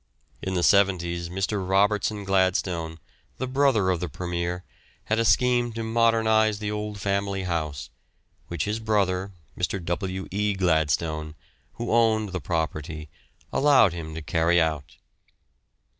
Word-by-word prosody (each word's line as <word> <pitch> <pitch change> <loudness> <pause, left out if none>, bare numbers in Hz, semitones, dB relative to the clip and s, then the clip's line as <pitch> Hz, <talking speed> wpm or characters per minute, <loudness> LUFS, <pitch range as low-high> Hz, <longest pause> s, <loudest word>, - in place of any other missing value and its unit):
In 95 0 -3
the 90 - 0
'seventies 85 -4 +2
Mr. 95 +3 -2
Robertson 105 +1 +2
Gladstone, 95 -4 0 0.4
the 130 - -2
brother 130 -7 +2
of 90 - -1
the 90 - -3
Premier, 90 +1 -3 0.4
had 110 +1 0
a - - +3
scheme 120 0 +3
to 115 0 -4
modernise 110 -1 +3
the 105 0 -3
old 105 -1 -4
family 100 -1 -1
house, 75 -7 -3 0.6
which 85 -3 -3
his 105 +2 -2
brother, 100 -3 0 0.2
Mr. 90 +2 -1
W. 95 +2 -3
E. 105 +1 0
Gladstone, 80 -3 0 0.4
who 120 - -4
owned 110 -2 +3
the 95 -1 -4
property, 80 -2 -3 0.4
allowed 135 - +5
him 80 -2 -6
to 80 - -6
carry 85 +3 +2
out. 80 -4 -1
95 Hz, 135 wpm, -25 LUFS, 85-105 Hz, 0.6 s, allowed